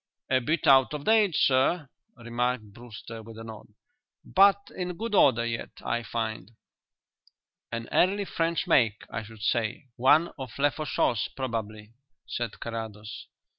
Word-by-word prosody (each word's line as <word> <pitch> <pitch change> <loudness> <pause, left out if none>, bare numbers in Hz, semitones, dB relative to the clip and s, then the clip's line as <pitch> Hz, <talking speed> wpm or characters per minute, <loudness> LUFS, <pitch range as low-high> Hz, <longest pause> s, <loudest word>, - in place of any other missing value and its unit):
"A 130 - +4
bit 155 +6 -1
out 135 +1 +5
of 145 - -6
date, 215 -6 +4
sir," 135 +5 +3 0.3
remarked 120 -2 -2
Brewster, 115 -1 -10
with 110 0 -12
a 115 - -8
nod. 110 -1 -10 0.6
"But 200 +1 +5 0.2
in 180 -2 -4
good 225 +1 -4
order 125 - +5
yet, 115 0 -3 0.2
I 120 - 0
find." 110 -1 -4 1.2
"An 115 -1 -4
early 200 +3 +3
French 165 -2 -1
make, 110 -5 +3
I 115 - -3
should 110 -1 -12
say; 120 +5 -1
one 150 +7 +4
of 130 -4 -7
Lefaucheux's 145 -5 +1
probably," 110 -4 -5 0.3
said 120 -3 -4
Carrados. 110 -2 -7
120 Hz, 135 wpm, -27 LUFS, 115-150 Hz, 1.2 s, out